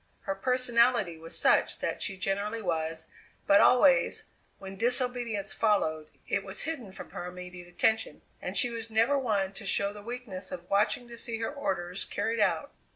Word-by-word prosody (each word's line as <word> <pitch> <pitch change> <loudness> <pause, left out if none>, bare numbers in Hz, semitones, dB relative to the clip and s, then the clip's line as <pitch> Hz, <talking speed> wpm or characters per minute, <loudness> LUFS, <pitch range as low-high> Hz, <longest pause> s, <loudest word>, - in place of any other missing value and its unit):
Her 195 - -2
personality 235 -3 +2
was 165 +1 -5
such - - +3
that - - -3
she 195 -3 0
generally 200 +4 -1
was; 160 -2 -2 0.4
but 200 - +6
always, 265 +1 +5 0.3
when 195 0 -9
disobedience 240 -2 0
followed, 155 -8 +1 0.2
it 200 - 0
was 190 0 -3
hidden 285 -10 -5
from - - -10
her 175 - -6
immediate 180 0 -9
attention, 220 +5 0 0.2
and - - -3
she 245 -4 +3
was 230 -1 -4
never 225 +5 +3
one 200 -6 0
to - - -5
show 200 0 +1
the 205 - -10
weakness 215 -5 -7
of 175 -1 -7
watching 210 +4 +2
to 235 0 -4
see 230 -2 -2
her 225 +5 -3
orders 185 -9 -2
carried 220 +3 -2
out. - - +1
205 Hz, 170 wpm, -29 LUFS, 185-235 Hz, 0.4 s, but